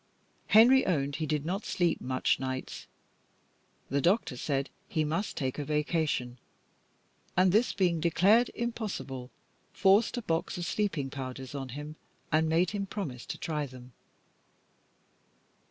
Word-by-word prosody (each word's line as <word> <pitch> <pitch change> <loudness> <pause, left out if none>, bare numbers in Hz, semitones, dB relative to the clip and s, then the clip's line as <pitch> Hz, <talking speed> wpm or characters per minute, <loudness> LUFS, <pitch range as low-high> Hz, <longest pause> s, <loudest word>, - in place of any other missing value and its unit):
Henry 245 +5 +7
owned 145 -5 0
he 155 - -2
did 150 -1 -1
not 190 +5 -2
sleep 175 -2 0
much 130 0 +1
nights. 130 0 -5 1.0
The 140 +1 +2
doctor 180 - +2
said 135 +1 -2 0.2
he 155 - 0
must 165 +7 -2
take 130 0 -2
a - - -1
vacation, 150 -4 -1 1.0
and, 185 0 +5
this 220 +6 +3
being 175 -4 +1
declared 195 +9 +4
impossible, 210 - -4 0.4
forced 205 +5 +3
a 240 - -3
box 165 -1 -1
of 175 - -3
sleeping 165 -10 -1
powders 130 -1 -6
on 135 -2 -5
him, 150 +1 -7 0.3
and 160 0 +3
made 170 +2 +2
him 200 -1 -3
promise 150 - -5
to - - -5
try 150 -3 -2
them. 125 -1 -13
160 Hz, 140 wpm, -30 LUFS, 135-190 Hz, 1.0 s, Henry